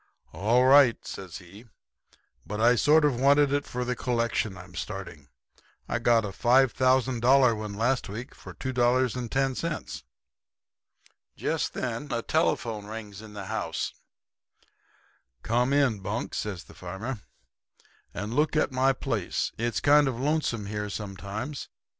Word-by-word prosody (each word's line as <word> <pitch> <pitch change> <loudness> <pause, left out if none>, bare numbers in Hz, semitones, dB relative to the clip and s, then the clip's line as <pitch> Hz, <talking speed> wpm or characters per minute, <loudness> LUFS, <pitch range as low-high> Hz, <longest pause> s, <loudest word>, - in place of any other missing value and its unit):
"'All 120 +6 +3
right,' 135 -3 +6
says 95 -4 -7
he. 95 +6 -14 0.8
'But 105 - -5
I 120 +2 +5
sort 150 +4 +4
of 130 -5 +1
wanted 140 +1 +4
it 145 0 0
for 125 0 -3
the 125 0 -1
collection 115 -4 -1
I'm 90 0 -12
starting. 85 -6 -7 0.6
I - - -1
got 115 -2 +3
a - - -3
$5,000 130 +1 +3
one 105 -1 -5
last 125 +3 0
week 115 +6 -7
for - - -12
$2.10.' 130 +4 -1 1.4
"Just - - -1
then 125 +3 -4
a 115 -1 -1
telephone 120 -8 0
bell 105 - -10
rings 105 -2 -8
in 110 -1 -12
the 100 -2 -7
house. - - -3 1.5
"'Come 120 +3 +1
in, 140 -7 +2
Bunk,' 95 - -4
says 100 -5 -4
the - - -16
farmer, 100 +7 -6 0.9
'and 105 +2 -5
look 150 +4 +1
at 155 - +2
my 130 +1 +3
place. - - -2
It's 120 0 0
kind 145 0 +5
of 125 -3 -2
lonesome 140 -6 0
here 105 0 -4
sometimes. 105 +7 -6
120 Hz, 135 wpm, -27 LUFS, 105-135 Hz, 1.5 s, right